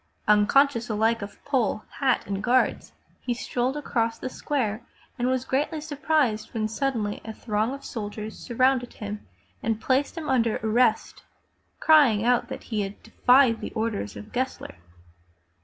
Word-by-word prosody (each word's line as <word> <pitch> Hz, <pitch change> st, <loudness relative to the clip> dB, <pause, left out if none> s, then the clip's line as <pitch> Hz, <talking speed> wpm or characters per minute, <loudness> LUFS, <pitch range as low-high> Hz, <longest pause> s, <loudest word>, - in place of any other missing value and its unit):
Uncon 210 Hz, +7 st, +6 dB
scious 240 Hz, -4 st, -6 dB
alike 225 Hz, +2 st, +1 dB
of 200 Hz, 0 st, -9 dB
pole, 245 Hz, -6 st, 0 dB, 0.2 s
hat 265 Hz, -3 st, +2 dB
and 195 Hz, -1 st, -3 dB
guards 250 Hz, +2 st, +1 dB, 0.3 s
he 245 Hz, -, -2 dB
strolled 250 Hz, +3 st, -2 dB
across 230 Hz, -5 st, -1 dB
the 255 Hz, -, -5 dB
square 235 Hz, -7 st, -2 dB, 0.4 s
and 245 Hz, -, +1 dB
was 260 Hz, 0 st, 0 dB
greatly 295 Hz, +4 st, -1 dB
surprised 290 Hz, -8 st, 0 dB
when 215 Hz, -1 st, 0 dB
suddenly 220 Hz, -3 st, -2 dB
a 220 Hz, -, -6 dB
throng 215 Hz, +1 st, -1 dB
of 275 Hz, +1 st, -8 dB
soldiers 215 Hz, -1 st, -6 dB
surrounded 255 Hz, 0 st, +1 dB
him 210 Hz, 0 st, -6 dB, 0.4 s
and 225 Hz, -1 st, -1 dB
placed 270 Hz, +7 st, 0 dB
him 315 Hz, -2 st, -4 dB
under 235 Hz, -5 st, +2 dB
arrest, 225 Hz, 0 st, +1 dB, 0.6 s
crying 270 Hz, -9 st, +5 dB
out 245 Hz, 0 st, +3 dB
that -, -, -7 dB
he 215 Hz, -3 st, -2 dB
had 195 Hz, 0 st, -6 dB
defied 245 Hz, +1 st, +4 dB
the -, -, -4 dB
orders 220 Hz, -, -2 dB
of 105 Hz, 0 st, -10 dB
Gessler. 260 Hz, +1 st, -3 dB
235 Hz, 155 wpm, -26 LUFS, 215-265 Hz, 0.6 s, Uncon